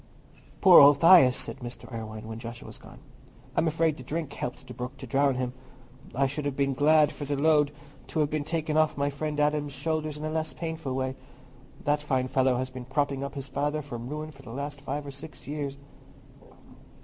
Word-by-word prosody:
"Poor 185 -3 +9
old 145 0 +8
Thias!" 165 -7 +8
said - - -1
Mr. 120 -1 -8
Irwine, 110 -1 -6
when 110 0 -6
Joshua 115 0 -8
was - - -10
gone. - - -14 0.6
"I'm 160 - +2
afraid 160 -1 +1
the 130 - -9
drink 150 +2 -4
helped 125 +1 -5
the 125 - -9
brook 125 +3 -6
to 130 - -8
drown 135 +2 +2
him. 125 -1 -2 0.6
I 135 +2 +3
should 145 +2 -3
have 145 -2 -1
been 140 -1 +1
glad 150 +2 +4
for - - -7
the 145 +1 -1
load 150 0 +3 0.4
to 160 - -3
have 150 - 0
been 155 -1 -1
taken 155 0 -1
off 155 -2 +3
my 140 0 0
friend 150 +1 -3
Adam's 150 -1 +1
shoulders 155 +1 -2
in 150 - -5
a 155 - -2
less 160 0 -2
painful 160 -5 -4
way. 130 0 -2 0.7
That 145 0 +1
fine 130 -3 0
fellow 130 -1 +2
has 130 +1 -3
been 130 -1 -8
propping 140 +1 -1
up 140 +1 -6
his 140 -1 -5
father 145 +2 -1
from 120 -3 -7
ruin 155 +1 -5
for 135 -2 -15
the 135 - -12
last 140 +3 -5
five 145 +1 -4
or 140 - -6
six 140 +3 -11
years." 140 -1 -4
145 Hz, 210 wpm, -28 LUFS, 130-150 Hz, 0.7 s, Poor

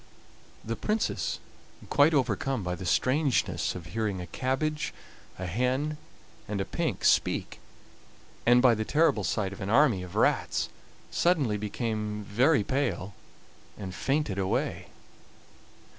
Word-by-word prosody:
The 115 +1 -2
Princess, 215 - -1 0.5
quite 145 +2 +5
overcome 135 -3 0
by 90 0 -2
the 90 +1 -5
strangeness 135 - +1
of 90 -3 -7
hearing 100 +2 -2
a 90 - -5
cabbage, 150 +8 -2 0.4
a 95 - -4
hen, 130 - 0 0.5
and 105 -1 -2
a 95 - -1
pink - - -2
speak, - - +2 0.8
and 120 +1 +5
by 125 -2 +7
the 110 -1 -1
terrible 145 -4 +2
sight 95 +1 -1
of - - -10
an 95 - -3
army 120 -5 +4
of 90 -1 -9
rats, - - +1 0.4
suddenly 150 -11 +2
became 105 0 -3
very 125 +6 +3
pale, 120 -6 -1 0.6
and 95 -3 -6
fainted 135 -3 -1
away. 95 -1 -1
115 Hz, 130 wpm, -28 LUFS, 100-140 Hz, 0.8 s, by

